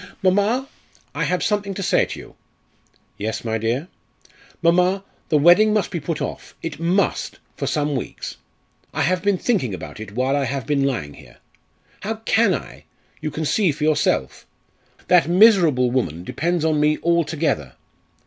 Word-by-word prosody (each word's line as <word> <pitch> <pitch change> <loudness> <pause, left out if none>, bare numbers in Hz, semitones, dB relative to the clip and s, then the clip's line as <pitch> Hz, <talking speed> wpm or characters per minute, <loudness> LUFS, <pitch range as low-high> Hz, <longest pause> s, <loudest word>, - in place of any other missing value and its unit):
"Mamma! 205 +8 +2 0.5
I - - -1
have 180 0 0
something 205 -2 -1
to 195 - -4
say - - +3
to - - -7
you." - - -13 0.8
"Yes, 110 +3 -3
my 110 0 -1
dear." 120 +9 -1 0.8
"Mamma, 180 +3 +3 0.3
the 155 - +4
wedding 175 +8 +6
must 210 -4 0
be 170 - -2
put 150 +1 -3
off! - - -7
it 165 -2 -5
must! 175 +4 0 0.2
for - - -3
some 150 -2 0
weeks. 130 - -5 0.6
I - - +1
have 185 0 +1
been 200 0 +2
thinking 175 - 0
about 95 - -9
it 105 -2 -8
while 130 +4 +1
I 140 -1 +1
have 135 -2 -3
been 140 0 +1
lying 110 - -2
here. - - -16 0.6
How 220 +2 -3
can 220 -3 +2
I? - - -9 0.4
you 155 - -2
can 155 +2 -4
see 180 +4 +2
for 150 +1 -5
yourself. 150 -2 0 0.6
That 175 -3 +4
miserable 175 - +5
woman 85 - -1
depends 170 - -1
on 155 -2 +2
me 150 +1 +3
altogether. 160 - 0
160 Hz, 165 wpm, -21 LUFS, 135-185 Hz, 0.8 s, wedding